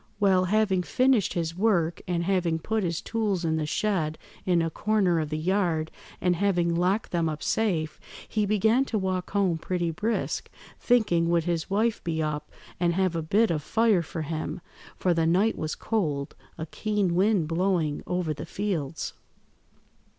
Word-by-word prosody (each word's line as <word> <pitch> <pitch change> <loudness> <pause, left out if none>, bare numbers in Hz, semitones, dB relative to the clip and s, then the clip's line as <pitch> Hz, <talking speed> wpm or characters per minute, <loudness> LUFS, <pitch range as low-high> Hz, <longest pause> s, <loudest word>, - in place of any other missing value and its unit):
Well, 190 -3 +4
having 200 -1 +2
finished 235 - +2
his 165 -1 -2
work, 180 -5 +1
and 175 -1 0
having 175 -3 +1
put 220 +7 -1
his 170 -2 -1
tools 210 -6 -1
in 160 -1 +1
the 155 -1 -1
shed 160 -4 0 0.3
in 175 -2 +3
a 165 - -2
corner 195 -3 +1
of 155 -1 -2
the 155 - -2
yard, 165 -2 0 0.3
and 180 -1 +2
having 175 -2 +1
locked 185 +5 0
them 170 -2 +1
up 155 -1 -5
safe, 170 -9 0 0.3
he 210 -2 0
began 220 +5 +3
to 230 - -2
walk 185 -2 -2
home 190 -5 +1
pretty 175 0 -1
brisk, 215 +8 -2 0.3
thinking 205 -9 +2
would 170 -1 +2
his 170 0 -2
wife 220 +3 +1
be 165 -2 -2
up 150 -1 -2 0.3
and 170 -1 +2
have 185 -2 +1
a 165 - 0
bit 205 +8 +2
of 155 -2 -1
fire 220 +2 +2
for 160 0 -5
him, 155 +3 -4 0.4
for 180 - +2
the 165 -1 +1
night 195 +7 +3
was 155 0 -3
cold, 150 -11 -2 0.2
a 160 - -4
keen 205 +1 -1
wind 190 -2 +2
blowing 165 -3 0
over 180 -3 -1
the 150 +3 -8
fields. 165 -7 -3
175 Hz, 170 wpm, -27 LUFS, 160-205 Hz, 0.4 s, Well